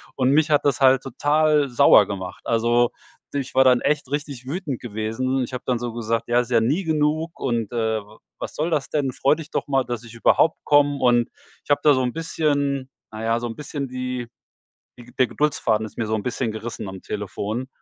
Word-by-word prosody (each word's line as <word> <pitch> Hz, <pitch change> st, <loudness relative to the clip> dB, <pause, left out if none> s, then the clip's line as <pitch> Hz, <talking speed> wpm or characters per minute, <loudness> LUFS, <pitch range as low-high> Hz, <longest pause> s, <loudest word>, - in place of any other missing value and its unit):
Und 130 Hz, 0 st, +2 dB
mich 155 Hz, +2 st, +3 dB
hat 145 Hz, -2 st, +2 dB
das 140 Hz, -4 st, +2 dB
halt 130 Hz, 0 st, +5 dB
total 150 Hz, +2 st, +2 dB
sauer 115 Hz, -4 st, +6 dB
gemacht. 95 Hz, -2 st, -6 dB
Also, 120 Hz, +1 st, +2 dB, 0.4 s
du, -, -, -3 dB
ich 135 Hz, -2 st, -4 dB
war 130 Hz, -, +5 dB
dann 125 Hz, -2 st, +4 dB
echt 145 Hz, -3 st, 0 dB
richtig 145 Hz, -3 st, -4 dB
wütend 150 Hz, -4 st, -4 dB
gewesen. 120 Hz, +4 st, -2 dB
Ich 125 Hz, -, -7 dB
habe 125 Hz, -, -5 dB
dann 125 Hz, -, +1 dB
so 120 Hz, -1 st, -4 dB
gesagt: 115 Hz, 0 st, -2 dB
„Ja, 120 Hz, 0 st, +3 dB
ist 125 Hz, -1 st, -2 dB
ja 120 Hz, -2 st, +4 dB
nie 140 Hz, +12 st, +1 dB
genug“ 155 Hz, +1 st, 0 dB
und, 115 Hz, -5 st, -1 dB
äh: 110 Hz, -2 st, -1 dB
„W 105 Hz, +2 st, -17 dB, 0.2 s
was -, -, -6 dB
soll 160 Hz, +3 st, -1 dB
das 150 Hz, -4 st, 0 dB
denn? 140 Hz, -3 st, 0 dB
Freu 135 Hz, +3 st, +2 dB
dich 160 Hz, -1 st, -10 dB
doch -, -, -2 dB
mal, 135 Hz, -2 st, +2 dB
dass 120 Hz, -1 st, -4 dB
ich 115 Hz, 0 st, -12 dB
überhaupt 155 Hz, +6 st, +3 dB
komme.“ 145 Hz, -1 st, +3 dB
Und 120 Hz, -2 st, +3 dB, 0.3 s
ich -, -, -25 dB
habe 145 Hz, -, +3 dB
da 150 Hz, -, +6 dB
so 130 Hz, -, +1 dB
'n 125 Hz, -1 st, -1 dB
bisschen 145 Hz, -4 st, -1 dB, 0.2 s
na 110 Hz, 0 st, -7 dB
ja, 115 Hz, +1 st, +1 dB
so 120 Hz, -, -5 dB
'n 115 Hz, -1 st, -5 dB
bisschen 145 Hz, -1 st, -5 dB
die 125 Hz, -1 st, -4 dB, 0.7 s
die 120 Hz, -, -12 dB
Ge 120 Hz, -, -17 dB
der 130 Hz, -, +5 dB
Geduldsfaden 115 Hz, -8 st, 0 dB
ist 110 Hz, -, -12 dB
mir 115 Hz, -, -1 dB
so 110 Hz, -, 0 dB
'n 105 Hz, -, -3 dB
bisschen 125 Hz, -2 st, -2 dB
gerissen 110 Hz, -1 st, -6 dB
am 95 Hz, -1 st, -8 dB
Telefon. 105 Hz, +4 st, -4 dB
125 Hz, 225 wpm, -23 LUFS, 115-145 Hz, 0.7 s, sauer